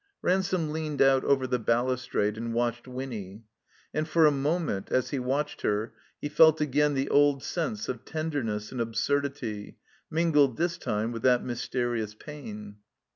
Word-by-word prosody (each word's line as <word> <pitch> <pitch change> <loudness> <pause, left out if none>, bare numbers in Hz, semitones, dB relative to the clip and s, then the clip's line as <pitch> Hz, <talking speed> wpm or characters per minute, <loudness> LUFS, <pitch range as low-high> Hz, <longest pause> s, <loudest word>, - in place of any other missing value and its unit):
Ransome 185 -4 +1
leaned 155 -2 -3
out 135 -1 +5
over 135 -2 +2
the 125 -1 0
balustrade 115 -2 0
and 115 +1 -4
watched 120 +1 -1
Winny. 115 -6 -6 0.5
And 155 0 -1
for 160 0 +4
a 150 - +6
moment, 145 - -1
as 130 - +1
he 140 - -1
watched 135 +4 -2
her, 105 +2 -1 0.3
he - - -3
felt 160 +1 +6
again 150 0 +2
the 135 +1 0
old 145 -1 +4
sense 135 -12 -2
of 125 -2 -4
tenderness 140 -10 -3
and 125 - -3
absurdity, 115 -2 -2 0.3
mingled, 150 -6 +3
this 175 +1 -1
time, 110 -2 -1
with 115 -1 -5
that 125 0 +4
mysterious 120 -3 -2
pain. 105 -7 -9
130 Hz, 155 wpm, -28 LUFS, 115-150 Hz, 0.5 s, a